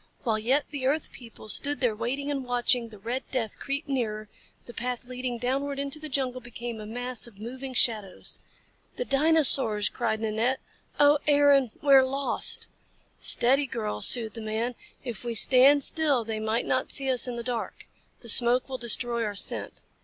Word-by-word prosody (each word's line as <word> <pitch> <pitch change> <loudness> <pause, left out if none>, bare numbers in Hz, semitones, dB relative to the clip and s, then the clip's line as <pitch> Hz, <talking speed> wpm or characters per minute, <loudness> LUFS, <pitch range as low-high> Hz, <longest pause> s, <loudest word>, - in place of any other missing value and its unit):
While 220 -3 -1
yet 260 +7 0
the 275 -3 -4
earth 300 +3 -2
people 230 -3 -14
stood 285 +6 0
there 240 -5 0
waiting 265 +6 -4
and 275 -2 -4
watching 245 -1 -1
the 215 - -14
red 235 +6 -5
death 230 -5 -4
creep 280 +2 -5
nearer, 215 -6 -4 0.4
the 240 - -12
path 245 +1 -5
leading 250 -1 -5
downward 275 +4 -3
into 280 +2 -5
the 310 0 -9
jungle 255 -2 -4
became 240 -1 -8
a 210 - -10
mass 245 +2 -5
of 220 -4 -18
moving 255 +4 -8
shadows. 215 -6 -1 0.6
"The - - -5
dinosaurs!" 275 - +3
cried 220 -2 -3
Nanette. 225 +4 -2 0.4
"Oh, 290 0 +4
Aaron! 285 -3 +3
We 280 -1 +3
are 265 -1 +7
lost!" 270 +1 +1 0.5
"Steady, 270 +4 +3
girl," 105 - -5
soothed 225 - +8
the 225 - -9
man. 220 +3 -4 0.3
"If 240 -3 -8
we 235 -1 -5
stand 270 +5 +4
still 285 -7 +1
they 220 -1 -5
might 220 +2 -2
not 255 - -2
see 275 - +3
us 255 0 +4
in 245 - -5
the 235 - -6
dark. 240 -2 -6 0.4
The 235 - -10
smoke 240 +2 +7
will 260 -1 -7
destroy 235 0 +3
our 210 -2 -5
scent." - - -3
245 Hz, 180 wpm, -25 LUFS, 230-275 Hz, 0.6 s, soothed